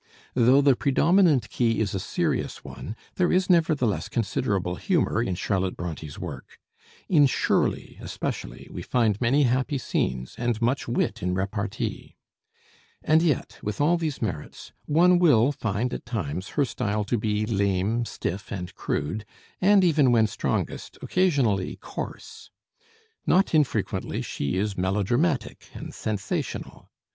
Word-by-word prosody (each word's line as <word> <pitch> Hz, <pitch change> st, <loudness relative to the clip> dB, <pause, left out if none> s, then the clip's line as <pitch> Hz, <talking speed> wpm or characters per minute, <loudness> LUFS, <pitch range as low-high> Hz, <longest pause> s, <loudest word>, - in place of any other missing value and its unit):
Though 130 Hz, +3 st, +5 dB
the 140 Hz, -2 st, +5 dB
predominant 160 Hz, +2 st, +3 dB
key 115 Hz, -2 st, +1 dB
is 105 Hz, -3 st, 0 dB
a 95 Hz, -, -1 dB
serious -, -, -2 dB
one, 110 Hz, -, -7 dB, 0.2 s
there 180 Hz, -1 st, +2 dB
is 185 Hz, +1 st, +2 dB
nevertheless 155 Hz, -, +2 dB
considerable 100 Hz, -5 st, -1 dB
humor 175 Hz, -, +1 dB
in 95 Hz, -6 st, -1 dB
Charlotte 95 Hz, 0 st, -1 dB
Bronté's 80 Hz, -4 st, -6 dB
work. -, -, -8 dB, 0.5 s
In 150 Hz, -6 st, +5 dB
'Shirley' 130 Hz, -, 0 dB
especially -, -, -5 dB
we -, -, -6 dB
find 115 Hz, -4 st, +1 dB
many 135 Hz, +5 st, +3 dB
happy 130 Hz, +3 st, +1 dB
scenes, 65 Hz, -, -2 dB
and 120 Hz, -2 st, 0 dB
much 120 Hz, +4 st, 0 dB
wit 115 Hz, -2 st, -1 dB
in 90 Hz, 0 st, -1 dB
repartee. 100 Hz, +2 st, -3 dB, 0.9 s
And 155 Hz, +1 st, +4 dB
yet, 160 Hz, -6 st, -1 dB
with 105 Hz, 0 st, -4 dB
all 155 Hz, +4 st, +4 dB
these 160 Hz, -7 st, -3 dB
merits, 80 Hz, -9 st, -5 dB
one 175 Hz, +4 st, +4 dB
will 145 Hz, -7 st, +5 dB
find 115 Hz, -1 st, -2 dB
at -, -, -5 dB
times 95 Hz, -, -3 dB
her 145 Hz, -, +4 dB
style 105 Hz, -3 st, -2 dB
to 115 Hz, +2 st, -1 dB
be 105 Hz, 0 st, 0 dB
lame, 100 Hz, +2 st, +1 dB
stiff, 100 Hz, -1 st, -5 dB
and 90 Hz, -2 st, -5 dB
crude, 75 Hz, +9 st, -3 dB, 0.4 s
and 195 Hz, +1 st, +5 dB
even 150 Hz, -7 st, +4 dB
when 115 Hz, -2 st, +5 dB
strongest, 105 Hz, -, -3 dB
occasionally 135 Hz, -, +1 dB
coarse. -, -, -8 dB, 0.8 s
Not 190 Hz, 0 st, +3 dB
infrequently 150 Hz, -4 st, 0 dB
she 70 Hz, +6 st, -2 dB
is 100 Hz, +1 st, -1 dB
melodramatic 110 Hz, -, 0 dB
and -, -, -7 dB
sensational. 105 Hz, -3 st, -4 dB
115 Hz, 135 wpm, -26 LUFS, 100-145 Hz, 0.9 s, Though